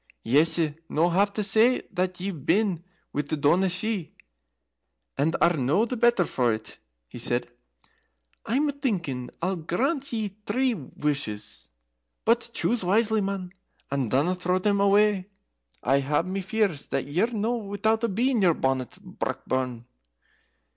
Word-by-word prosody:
"Yese 155 +5 +3 0.2
no 165 +3 +2
have 200 +4 +3
to 210 +1 -2
say 220 +5 +4
that 180 0 -1
ye've 180 -6 -4
been 195 -4 +1 0.3
with 145 0 -2
the 155 - -1
Daoiné 175 +7 +3
Shi 185 0 -2 1.0
and 160 +4 +1
are 175 - +4
no 150 - +2
the 250 - -3
better 235 -5 +3
for 125 -6 +1
it," 110 0 -6 0.3
he - - -9
said. - - 0 1.0
"I'm 285 +6 +1
thinking 175 - -2
I'll 185 +1 0
grant 265 - -1
ye 220 -3 -1 0.2
three 255 +4 +2
wushes. 140 - -4 0.6
But 235 +1 +2
choose 235 -2 0
wisely, 215 +3 +2
man, 195 -2 -3 0.4
and 135 -4 0
dinna 145 +9 +2
throw 180 0 0
them 200 +1 +1
away. 200 -1 +3 0.6
I 135 +2 +3
hae 145 +3 +1
my 185 +2 -3
fears 195 -6 -1
that - - -2
ye're 175 +10 +1
no 230 +2 0
without 220 +1 -1
a 230 - +2
bee 240 +7 +1
in 235 -5 +1
your 175 -4 +4
bonnet, 130 -2 -1
Brockburn." 125 -3 -3
185 Hz, 145 wpm, -26 LUFS, 150-220 Hz, 1.0 s, say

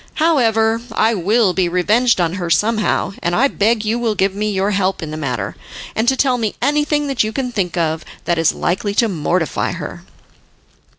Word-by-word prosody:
However, 230 -8 +2
I 225 +2 +2
will 205 +1 +2
be 180 -1 +1
revenged 210 +7 +2
on 170 -1 +1
her 175 - -3
somehow, 215 +2 +1
and 175 0 0
I 270 +7 +4
beg 220 -2 0
you 225 +3 0
will 225 -3 0
give 195 0 +1
me 210 +2 -2
your 200 0 0
help 195 -3 0
in 155 - -5
the - - -5
matter, 140 -5 -3 0.4
and 220 +2 0
to 265 +1 +3
tell 255 -2 +2
me 220 -3 -2
anything 295 0 +1
that 275 -5 +1
you 215 - -2
can 250 +2 -3
think 185 -6 -2
of 160 -1 0 0.2
that 170 -1 +1
is 165 - +3
likely 200 +3 -2
to 230 - +3
mortify 170 -2 -1
her." - - -7
210 Hz, 195 wpm, -18 LUFS, 180-235 Hz, 0.4 s, I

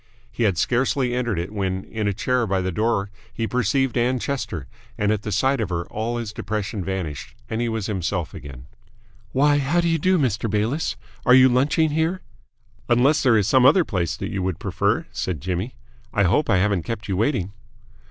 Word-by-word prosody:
He 110 - -6
had 95 -5 +1
scarcely 125 - +1
entered 120 -5 -1
it 85 +4 -3
when 95 -2 -2
in 110 -2 -3
a - - +2
chair 125 +3 0
by 95 -1 +1
the 95 0 -2
door 100 +1 0 0.2
he 115 - -3
perceived 125 +2 +1
Ann 125 +1 +2
Chester, 120 - -3 0.3
and 105 0 +1
at 105 -2 0
the 105 - -5
sight 135 +7 +2
of - - -2
her 85 -1 -2
all 115 +3 -2
his 115 -3 -5
depression 105 -2 -3
vanished 90 -9 -4 0.2
and 110 - -1
he 120 - 0
was 110 -3 -2
himself 90 -5 -2
again. 65 -3 -10 0.7
"Why, 145 +4 +3
how 145 +5 +1
do 170 - +1
you 165 -1 +1
do, 185 +4 +3
Mr. 120 - 0
Bayliss? 110 +10 0 0.3
Are 125 - +6
you 130 0 +7
lunching 145 +5 +2
here?" 160 +4 0 0.7
"Unless 135 +6 +4
there 125 -5 +4
is 105 -2 +1
some 130 +3 +4
other 155 +7 +6
place 85 -6 -2
that - - -4
you 95 - -2
would 95 -2 -1
prefer," - - 0
said 90 -5 -3
Jimmy. 95 - -3 0.4
"I 100 - +2
hope 95 - +2
I 95 - +4
haven't 100 -1 +2
kept 110 +4 -5
you 95 - -1
waiting." 105 -3 0
110 Hz, 200 wpm, -23 LUFS, 95-130 Hz, 0.7 s, you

